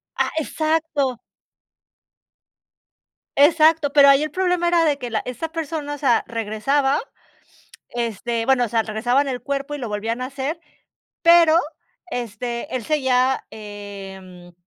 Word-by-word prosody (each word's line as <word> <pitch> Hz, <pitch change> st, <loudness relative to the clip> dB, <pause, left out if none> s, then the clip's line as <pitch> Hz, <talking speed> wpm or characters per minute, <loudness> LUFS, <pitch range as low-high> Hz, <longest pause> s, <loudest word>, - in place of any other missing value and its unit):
Ah, -, -, 0 dB
exacto. 310 Hz, -5 st, -1 dB, 2.2 s
Exacto, 310 Hz, 0 st, +5 dB
pero 280 Hz, -1 st, +7 dB
ahí 275 Hz, +1 st, +6 dB
el 305 Hz, -, -1 dB
problema 360 Hz, +1 st, 0 dB
era 340 Hz, -1 st, +3 dB
de 290 Hz, -2 st, +1 dB
que 245 Hz, -, -5 dB
la 220 Hz, -2 st, -1 dB
esta 255 Hz, +6 st, -5 dB
persona, 310 Hz, -3 st, -4 dB
o -, -, -10 dB
sea, 265 Hz, -5 st, +2 dB
regresaba 230 Hz, +5 st, 0 dB, 0.9 s
este, 235 Hz, 0 st, -3 dB
bueno 260 Hz, -1 st, +3 dB
o -, -, -4 dB
sea, 225 Hz, 0 st, +1 dB
regresaban 245 Hz, +6 st, 0 dB
el 255 Hz, -2 st, -3 dB
cuerpo 280 Hz, +1 st, -3 dB
y -, -, -5 dB
lo 245 Hz, -5 st, -5 dB
volvían 225 Hz, +4 st, -3 dB
a 255 Hz, -, -2 dB
hacer. 280 Hz, +4 st, -4 dB, 0.6 s
Pero, 335 Hz, -2 st, +6 dB, 0.5 s
este, 240 Hz, +3 st, -4 dB
él 240 Hz, -, -5 dB
seguía, 260 Hz, -3 st, +1 dB
eh, 195 Hz, -4 st, -10 dB
265 Hz, 135 wpm, -21 LUFS, 230-300 Hz, 2.2 s, pero